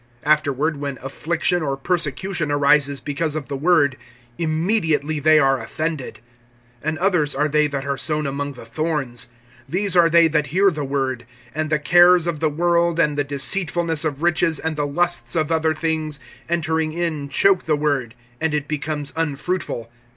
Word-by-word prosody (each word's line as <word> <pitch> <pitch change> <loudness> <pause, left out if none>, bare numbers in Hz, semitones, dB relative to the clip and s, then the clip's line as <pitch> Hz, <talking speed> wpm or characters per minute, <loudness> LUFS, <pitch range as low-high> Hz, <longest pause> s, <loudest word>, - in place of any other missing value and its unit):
Afterward, 150 0 +1
when 140 -2 -4
affliction 170 +5 -1
or 140 -3 -2
persecution 165 +1 -1
arises 145 -1 +3
because 150 +1 -2
of 145 -5 -5
the 140 - -3
word, 145 -3 +2 0.4
immediately 160 -3 +1
they 155 +2 +5
are 135 -3 +3
offended. 155 +4 -4 0.6
(18)And 155 +1 -1
others 175 -7 +1
are 150 +2 +1
they 150 0 +2
that 140 -2 -4
are 140 -1 -2
sown 155 +1 -1
among 140 +1 -3
the 125 - -12
thorns. 135 -1 -3 0.4
These 185 +3 0
are 170 -1 +6
they 170 0 +6
that 150 -1 0
hear 190 +6 +3
the 150 -3 -4
word, 135 -4 -2 0.3
(19)and 155 0 -1
the 155 - +2
cares 175 +3 +5
of 170 -3 -2
the 160 0 +1
world, 170 +2 +1
and 150 -3 +2
the 145 - +1
deceitfulness 160 +3 -1
of 150 -1 -3
riches, 165 -2 +2
and 160 -1 -3
the 145 -1 -1
lusts 175 +5 0
of 160 -1 0
other 160 -1 +1
things, 155 -2 -2 0.3
entering 160 -2 0
in 160 -4 -2
choke 190 +6 +3
the 155 - +2
word, 140 -6 -1 0.2
and 160 -1 0
it 145 -1 -2
becomes 150 -1 -4
unfruitful. 150 -6 -3
155 Hz, 170 wpm, -21 LUFS, 140-165 Hz, 0.6 s, are